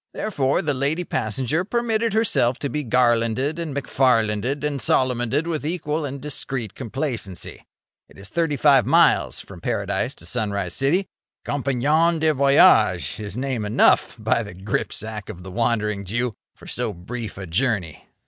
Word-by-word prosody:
Therefore 140 -11 0
the 150 -2 0
lady 140 +6 -1
passenger 130 - -1
permitted 230 +1 0
herself 200 - +2
to 140 - -3
be 150 0 -2
Garlanded 120 +4 +1
and 160 -5 -4
McFarlanded 125 -1 +1
and 145 -3 -1
Solomoned 130 +3 +1
with 165 -3 -3
equal 155 -1 -2
and 140 0 -5
discreet 135 -6 -4
complacency. 120 - -5 0.5
It - - -18
is 100 +2 -10
thirty 165 -4 0
five 135 -2 +5
miles - - +3
from - - -12
Paradise - - -2
to 85 - -12
Sunrise 100 -4 -2
City. 160 +9 +1 0.4
Compagnon 145 +5 +1
de 155 0 +2
voyage 135 - +4
is 105 +1 -6
name 130 -4 -2
enough, 105 +1 +3
by - - +1
the - - -8
gripsack 105 +2 -3
of 90 - -8
the 95 - -8
Wandering 105 -2 0
Jew! 120 +5 -2 0.2
for - - -16
so 120 -3 -2
brief 105 +5 -7
a 95 - -6
journey. 95 - -1
130 Hz, 150 wpm, -23 LUFS, 110-150 Hz, 0.5 s, five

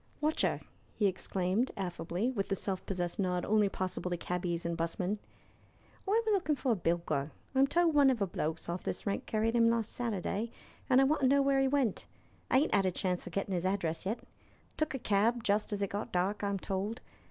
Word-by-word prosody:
"Watcheer!" 305 +1 +1 0.3
he 210 - +1
exclaimed, 190 +4 0
affably, 180 +4 -2
with 200 -6 -2
the 195 - +1
self 190 -1 -2
possessed 175 -2 -2
nod 180 -2 0
only 210 -1 +3
possible 185 -1 -3
to 175 - -1
cabbies 175 -1 -2
and 170 0 -1
'busmen. 180 +5 -1 0.9
"I'm 445 +2 +2
a - - +3
lookin' 370 -7 +2
for 265 -2 0
a - - +3
bilker. 165 -5 0 0.2
I'm 270 +1 +5
told 340 +2 +3
one 285 -2 +6
o' 260 - +3
the 210 -4 0
blokes 160 -3 -3
off 170 +1 -3
this - - -4
rank 200 - -2
carried 225 +1 +1
'im 230 -1 +5
last 230 -2 0
Saturday, 220 -1 -2 0.4
and 260 0 +6
I - - +6
want 290 +2 +2
to 265 - +5
know 280 +1 +4
where 275 0 +3
he 270 - +3
went. 265 -6 0 0.4
I - - +5
ain't 305 - 0
'ad 195 -2 +4
a - - +2
chance 180 0 -2
o' - - -4
gettin' 195 +2 -2
'is 175 -1 0
address 185 -3 -1
yet. 220 +4 -1 0.6
Took 310 -3 -1
a - - 0
cab 225 +1 +2
just 210 +1 +1
as 200 -1 0
it 200 - -2
got 205 +1 -3
dark, 195 +3 0
I'm 200 -1 0
told. 195 +5 -3
200 Hz, 215 wpm, -32 LUFS, 180-250 Hz, 0.9 s, one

